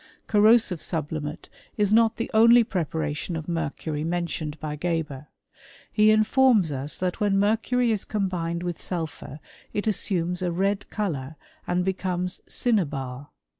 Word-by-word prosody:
Corrosive 210 -5 +4
sublimate 155 -2 -4 0.3
is 210 -1 +2
not 225 0 +4
the 230 - -3
only 230 +2 +7
prepe 160 -7 -2
tion 165 +3 -4
of 160 -1 -5
mercury 155 -2 -3
mentioned 165 -2 -3
by 150 -1 -4
Geber. 150 -3 -3 0.6
He 215 0 +4
infoi 215 - +4
us 140 +2 -4
that 180 -1 -2
when 205 -2 +2
mercury 225 +4 +2
is 210 -3 -1
combined 175 -4 -2
with 175 -2 -4
sulp] 165 -4 -3 0.5
it 205 - -2
assumes 180 -4 0
a 180 -1 0
red 195 +3 -1
colour, 155 -9 -3 0.3
and 180 0 0
becomes 180 -1 -2
cinnabar. 145 - -1
180 Hz, 135 wpm, -25 LUFS, 160-210 Hz, 0.6 s, only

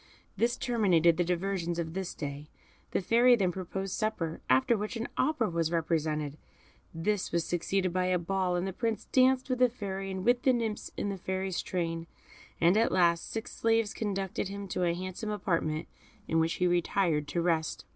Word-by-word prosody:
This 240 +1 +1
terminated 185 -10 +3
the 175 - +3
diversions 175 -1 -1
of 165 -1 -3
this 190 -1 -4
day. 145 0 -6 0.4
The - - 0
Fairy 240 +5 +5
then 190 -5 +1
proposed 190 +1 -4
supper, 175 -8 -2
after 130 - +4
which 210 +2 -3
an 230 0 -3
opera 300 -8 +1
was 165 -3 0
represented; 155 -3 -1 0.5
this 185 +4 -1
was 170 -1 0
succeeded 185 +1 0
by 185 0 +1
a 185 0 +2
ball, 180 +1 0
and 175 +1 0
the 190 - -3
Prince 225 +2 -2
danced 260 0 +3
with 255 -2 -1
the 250 -1 +5
Fairy, 195 -4 -5
and 190 0 -4
with 245 +1 +4
the 260 - +4
nymphs 225 -3 -2
in 205 - -1
the 195 - -3
Fairy's 190 0 -2
train, 165 -2 -3 0.5
and 175 +4 +4
at 230 - +3
last 170 -2 +2
six 225 +1 -5
slaves 225 -2 +2
conducted 195 -3 -2
him 200 0 -6
to 180 0 0
a 170 0 +1
handsome 185 +4 -5
apartment, 165 -6 -1 0.4
in 165 - +2
which 160 +1 +2
he 180 - 0
retired 175 -3 +1
to 175 - -2
rest. 160 -9 0
185 Hz, 185 wpm, -30 LUFS, 170-210 Hz, 0.5 s, Fairy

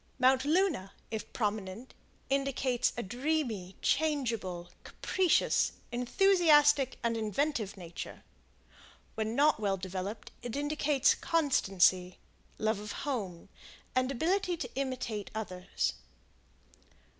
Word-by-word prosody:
Mount 260 +1 +4
Luna, 310 - +1 0.2
if 220 -1 -5
prominent, 210 +1 -3 0.3
indicates 270 -2 +1
a 240 - -2
dreamy, 240 - -2
changeable, 230 - 0
capricious, 370 -3 +1 0.2
enthusiastic, 295 - +4
and 230 0 +1
inventive 225 -1 -1
nature. 175 -2 -8 0.9
When 220 +1 -2
not 295 -2 +4
well 200 -2 0
developed, 190 +3 -5
it 240 0 -5
indicates 290 -1 +2
constancy, 190 - +2 0.4
love 215 -1 0
of 210 0 -6
home, 200 -12 -4 0.5
and 255 +1 +2
ability 355 +6 0
to 340 - -6
imitate 255 -6 -3
others. 185 -4 -2
245 Hz, 100 wpm, -31 LUFS, 200-290 Hz, 0.9 s, Mount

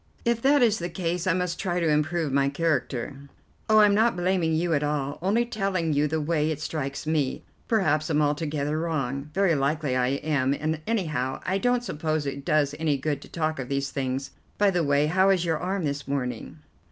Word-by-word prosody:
"If 235 -1 +1
that 280 +1 +4
is 220 -2 +3
the 175 +1 -3
case, 175 +1 -2
I 185 - +4
must 180 -1 -2
try 180 -1 -1
to 170 - +1
improve 155 0 +1
my 140 0 +3
character." 140 -3 -2 0.4
"Oh, 215 0 +7
I'm 210 -1 +5
not 225 +2 +3
blaming 175 -3 +1
you 170 +1 +1
at 145 - +2
all, 145 -1 -2
only 210 +6 +2
telling 195 -8 -1
you 145 +1 +2
the 160 +2 -1
way 155 0 0
it 155 -2 -2
strikes 150 -3 -4
me. 150 -4 -1 0.2
Perhaps 155 -8 +1
I'm 150 -2 +2
altogether 150 0 0
wrong. 140 -4 -2
Very 195 -3 +3
likely 145 -1 0
I 125 -1 +2
am, 140 0 0
and 155 +1 -2
anyhow 155 - -1
I 190 +1 0
don't 245 +2 +1
suppose 155 -6 -2
it 140 0 -4
does 150 -2 +2
any 155 -3 +1
good 140 +1 -2
to - - -13
talk 155 -3 -2
of 125 - -5
these 140 0 -1
things. 135 0 -3 0.3
By 205 -1 +4
the 175 -2 +1
way, 145 0 +3
how 185 +5 +3
is 185 -3 +2
your 160 -2 0
arm 190 +1 -2
this 140 -1 -3
morning?" 125 -1 -3
155 Hz, 205 wpm, -26 LUFS, 140-180 Hz, 0.4 s, Oh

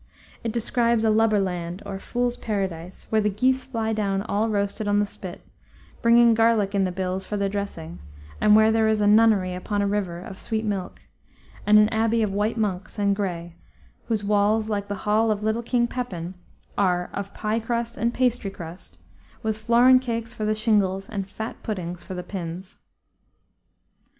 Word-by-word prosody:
It 230 - -1
describes 235 0 +1
a 220 - +4
lubber 215 -1 +3
land, 180 -1 -3
or 195 -1 -5
fool's 245 +3 -1
paradise, 190 -4 -4
where 220 0 +3
the 210 - +2
geese 255 +6 +1
fly 225 -4 -2
down 200 -2 0
all 215 +2 0
roasted 205 0 -1
on 205 0 +2
the 205 - +3
spit, 185 -3 -9 0.6
bringing 235 0 +6
garlic 225 -3 +3
in 195 -1 +2
the 185 - -1
bills 185 +1 -3
for 210 - -4
their 200 0 +1
dressing, 195 - -5 0.4
and 210 0 +6
where 220 0 +6
there 220 0 +3
is 220 -1 +2
a 205 - +2
nunnery 205 -3 +4
upon 205 +3 -2
a - - +1
river 200 -4 -1
of 185 +1 -9
sweet 220 -1 -2
milk, 195 -3 -4 0.6
and 210 0 +7
an 210 0 +6
abbey 225 0 +1
of 200 -2 -1
white 210 +3 0
monks 205 -2 -2
and 200 -1 +2
gray, 175 -4 -4 0.5
whose 220 -3 0
walls, 210 +2 +2
like 200 -1 -2
the 205 - -3
hall 215 +2 +3
of 210 -1 -1
little 220 +2 0
King 240 0 +1
Pepin, 190 -9 -4 0.5
are 180 -3 +1
"of 200 0 -5
pie 215 +2 -1
crust 235 +1 -2
and 235 +2 0
pastry 245 -4 0
crust," 170 - -10 0.5
with 220 -1 0
flouren 240 +4 +5
cakes 230 -2 -4
for 215 -3 -4
the 215 0 +1
shingles 200 -3 +1
and 195 -2 -4
fat 220 +3 -6
puddings 180 -5 -4
for 190 - -8
the 180 - -5
pins. 180 0 -7
210 Hz, 185 wpm, -24 LUFS, 195-225 Hz, 0.6 s, and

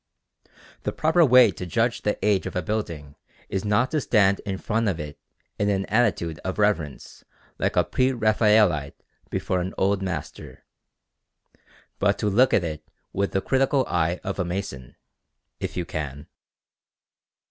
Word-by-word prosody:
The - - -2
proper 160 +2 +3
way 125 -6 +7
to 90 - -7
judge 115 +6 0
the 105 - -1
age 100 -3 +2
of - - -7
a 90 - -1
building 85 -10 -4 0.4
is 95 - -2
not 105 +5 +1
to 155 -1 0
stand 100 -5 +3
in 95 -1 -2
front 110 +2 0
of 85 -4 -3
it 75 -1 -7 0.4
in 105 - +1
an 95 -1 0
attitude 100 -9 0
of 95 - -3
reverence 100 -10 -1 0.4
like - - 0
a - - +4
pre 130 0 +1
Raphaelite 105 - +2 0.3
before 90 -1 -1
an 90 +2 -5
Old 100 +1 +1
Master, 90 -5 -6 1.3
but 100 0 +2
to 105 - 0
look 130 +6 +4
at 95 - +3
it 80 -2 -5 0.3
with 100 +1 -1
the 95 - 0
critical 135 +2 +2
eye 85 +1 0
of 100 -1 -4
a - - +2
mason, 85 -8 -5 0.6
if - - -5
you 90 - -2
can. 75 -3 -5
100 Hz, 160 wpm, -24 LUFS, 85-110 Hz, 1.3 s, way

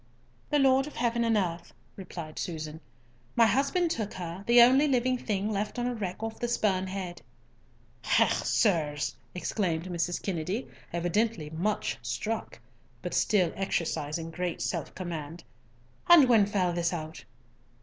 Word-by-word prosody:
"The 295 - +3
Lord 270 0 +4
of 300 - -10
heaven 235 0 +1
and 225 -1 +2
earth," 175 -3 -3 0.2
replied 170 -5 -7
Susan. 160 -2 -5 0.5
"My 230 - +6
husband 280 +8 +2
took 215 -9 -3
her, 175 +1 -6
the 240 +1 +7
only 260 +5 +7
living 255 -2 +2
thing 210 -1 -1
left 210 +2 -2
on 240 - -1
a 245 - 0
wreck 200 -2 -4
off 225 0 -4
the 240 - -1
Spurn 195 -5 +1
Head." 185 -2 -5 0.8
"Hech, - - +3
sirs!" 155 -8 +1 0.2
exclaimed 175 -3 -1
Mrs. 175 -1 -2
Kennedy, 190 +5 -3 0.2
evidently 175 -1 0
much 185 - -1
struck, 130 - -4 0.4
but - - -4
still 185 -6 +2
exercising 165 -4 -2
great 175 +1 -3
self 170 -5 -3
command. 165 -3 -6 0.7
"And 330 -6 +9
when 220 -5 +5
fell 185 -4 +1
this 170 0 0
out?" 160 -1 -6
190 Hz, 145 wpm, -29 LUFS, 170-230 Hz, 0.8 s, And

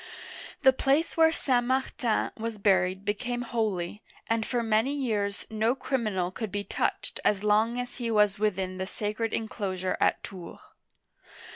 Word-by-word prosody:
The 265 -1 +7
place 280 +5 +1
where 320 -1 +6
St. 255 -6 +1
Martin 255 -2 0
was 225 -1 -4
buried 190 -1 +2
became 240 +4 -2
holy, 210 -5 -2 0.2
and 225 -1 0
for 240 -2 0
many 225 +5 +2
years 210 -7 -1
no 220 +3 +1
criminal 215 -10 -1
could 215 +1 -5
be 205 +1 -2
touched - - -2
as 205 -1 +2
long 220 +3 +3
as 245 0 -5
he 240 -2 -2
was 210 -2 +3
within 190 -3 -1
the 190 - -2
sacred 215 +3 -2
inclosure 190 -4 -2
at - - +2
Tours. 180 -4 -8
215 Hz, 150 wpm, -28 LUFS, 200-245 Hz, 0.2 s, The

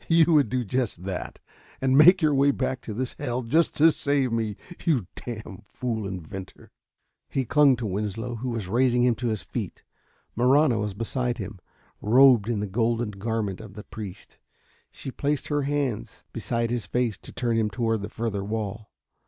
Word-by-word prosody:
"You 165 -1 +6
would 145 -7 +4
do 125 +1 0
just 115 -5 -2
that, 95 -1 -5 0.4
and 130 0 +2
make 175 +5 +7
your 150 -1 +4
way 140 +1 +4
back 130 -2 -1
to 110 - -6
this 130 +2 -2
hell 125 -3 -2
just 160 +8 +2
to 160 +2 +7
save 140 -4 0
me 110 -3 -1 0.3
you 135 - +2
damn 110 -5 -7
fool 115 -5 -3
inventor!" 95 0 -8 0.6
He 135 -2 -1
clung 140 +1 +5
to 120 -1 -5
Winslow, 105 +4 -3
who 125 +3 -4
was 115 -5 -3
raising 120 +3 +3
him 125 -1 +4
to 120 +2 -3
his 110 -3 -2
feet. - - -5 0.5
Marahna 125 0 +4
was 105 -2 -3
beside 120 +2 -2
him, 100 -2 -7 0.4
robed 120 -1 +6
in 110 -4 0
the - - -1
golden 115 +2 0
garment 105 -1 -3
of 100 -3 -11
the 105 - -8
priest. 105 -4 -9 0.5
She 135 - -8
placed 145 +1 -2
her 145 -1 +1
hands 140 -5 -2
beside 115 0 -1
his 120 -3 -2
face 120 -3 -1
to - - -12
turn 120 -2 -1
him 110 -2 +1
toward 115 +1 -1
the 100 - -5
further 110 -3 -3
wall. 105 0 -4
115 Hz, 180 wpm, -26 LUFS, 105-130 Hz, 0.6 s, make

